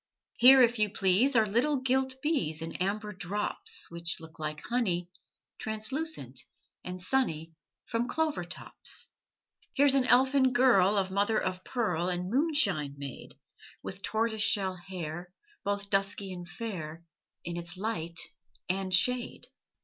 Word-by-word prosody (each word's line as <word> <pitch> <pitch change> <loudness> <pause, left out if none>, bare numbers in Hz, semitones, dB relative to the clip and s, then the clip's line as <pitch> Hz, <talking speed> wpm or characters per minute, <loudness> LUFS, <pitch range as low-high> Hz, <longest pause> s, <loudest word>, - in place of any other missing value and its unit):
Here, 260 +2 +8
if 240 -1 +2
you 210 -1 +3
please 205 +7 +3
Are 220 -2 +5
little 240 +8 +1
gilt 260 0 +1
bees 170 - 0
In 165 - -5
amber 210 +3 -2
drops 200 +2 -3
Which 170 0 -2
look 160 -1 -13
like 155 -1 -4
honey, 180 -8 -1 0.5
Translucent 260 +10 -3 0.4
and 180 0 -6
sunny, 165 -7 0 0.3
From 230 +1 -1
clover 315 +1 -1
tops. - - -5 0.7
Here's 280 -1 +5
an 270 -2 +3
elfin 260 +1 +4
girl 215 -6 +5
Of 190 -1 0
mother 205 +3 +2
of 185 -1 -3
pearl 180 -8 -1
And 180 +1 -3
moonshine 220 - +2
made, 140 -2 -8 0.5
With 190 +1 -6
tortoise 220 +1 -1
shell 195 -3 +2
hair 175 -1 -7 0.3
Both 200 0 -2
dusky 195 -1 0
and 175 -1 -8
fair 170 -5 -6 0.4
In 170 0 -4
its 175 +1 -7
light 170 -5 -3 0.5
and 190 +1 -1
shade. 245 +7 +2
200 Hz, 135 wpm, -30 LUFS, 175-245 Hz, 0.7 s, Here